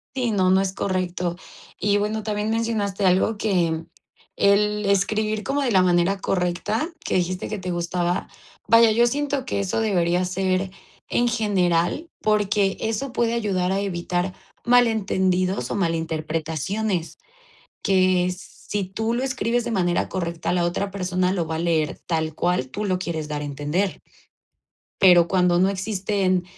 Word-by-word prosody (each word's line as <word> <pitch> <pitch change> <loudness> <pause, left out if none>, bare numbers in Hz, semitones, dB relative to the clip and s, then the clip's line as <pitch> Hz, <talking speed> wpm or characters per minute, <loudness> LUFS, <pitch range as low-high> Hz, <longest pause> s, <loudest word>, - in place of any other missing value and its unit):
Sí, 250 -3 0
no, 190 -3 +2
no 190 +1 +5
es 190 -1 -2
correcto. 180 -3 -2 0.4
Y 205 +1 +2
bueno, 210 +1 -1
también 210 0 -2
mencionaste 215 -4 0
algo 190 +4 +2
que 170 -6 0 0.5
el 210 +1 +3
escribir 215 +2 +1
como 280 +5 -1
de 255 - +1
la 190 -4 +4
manera 180 +2 +2
correcta 185 - -1
que - - -2
dijiste 180 0 -1
que 215 - -4
te 185 -1 -5
gustaba, 175 +1 -1 0.4
vaya, 230 -1 +7
yo 235 +2 +4
siento 285 +1 -1
que 200 - -1
eso 200 +2 -1
debería 180 -5 +1
ser 185 +1 -1 0.4
en 240 0 +2
general, 205 - 0
porque 205 -2 +1
eso 225 +5 -2
puede 230 -1 +1
ayudar 195 -6 0
a 195 - 0
evitar 180 -1 -2 0.3
malentendidos 190 - +2
o - - -1
mal 170 -4 +1
interpretaciones, 160 +4 -2 0.7
que 185 -2 +3
si 205 +1 -5
tú 220 +5 -2
lo 245 - -1
escribes 245 -3 0
de 240 - -3
manera 175 -5 0
correcta, 170 -3 -2
la 175 -1 +1
otra 195 +3 -1
persona 185 -1 0
lo 175 -4 -1
va 160 - -3
a - - -2
leer 165 -3 0
tal 160 -2 -1
cual 175 -6 0
tú 205 +10 -4
lo 185 -3 0
quieres 165 -4 -4
dar 150 -1 -3
a - - -4
entender. 150 +7 -2 1.0
Pero 175 -3 +7
cuando 180 -1 +2
no 190 +2 +3
existen 190 -2 0
190 Hz, 155 wpm, -23 LUFS, 175-210 Hz, 1.0 s, vaya